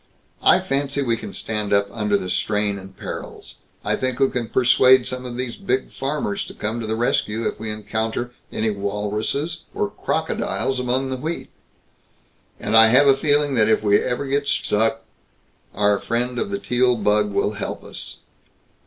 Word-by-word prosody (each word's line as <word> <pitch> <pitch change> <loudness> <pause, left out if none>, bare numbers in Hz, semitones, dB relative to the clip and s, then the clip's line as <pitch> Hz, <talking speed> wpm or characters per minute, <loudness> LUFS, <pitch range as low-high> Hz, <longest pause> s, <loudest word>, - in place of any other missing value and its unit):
"I - - +6
fancy 140 +1 -1
we 115 -3 +1
can 110 -3 -7
stand 105 -1 -3
up 100 0 +3
under 105 -2 +1
the 95 - -5
strain 105 +1 0
and 95 0 -13
perils. - - -8 0.3
I - - +2
think 130 0 -2
we 135 -1 +3
can 120 -2 -3
persuade 130 0 +5
some 125 0 -4
of 120 -1 -6
these 125 -2 -3
big 130 -10 -1
farmers 135 -7 -2
to - - -11
come 110 +3 -3
to 110 - -4
the 110 - -1
rescue 115 -1 0
if - - -4
we 110 0 -4
encounter 110 +3 -3 0.2
any 110 0 0
walruses 105 +11 -2
or - - -1
crocodiles 130 -1 -1
among 130 +2 -1
the 130 - -2
wheat. 160 +6 -4 1.1
And - - -1
I 110 0 +9
have 130 +6 +6
a 135 -1 +6
feeling 145 0 +2
that 110 -3 +3
if 110 - +2
we 105 -1 +4
ever 125 +3 -2
get 140 +1 -1
stuck, 110 -2 +1 0.7
our 105 -1 +2
friend 125 +1 -2
of 205 - -2
the 200 - -2
Teal 125 -7 +2
bug 105 0 +2
will 100 - +1
help 105 - -5
us." - - -7
115 Hz, 180 wpm, -22 LUFS, 105-130 Hz, 1.1 s, I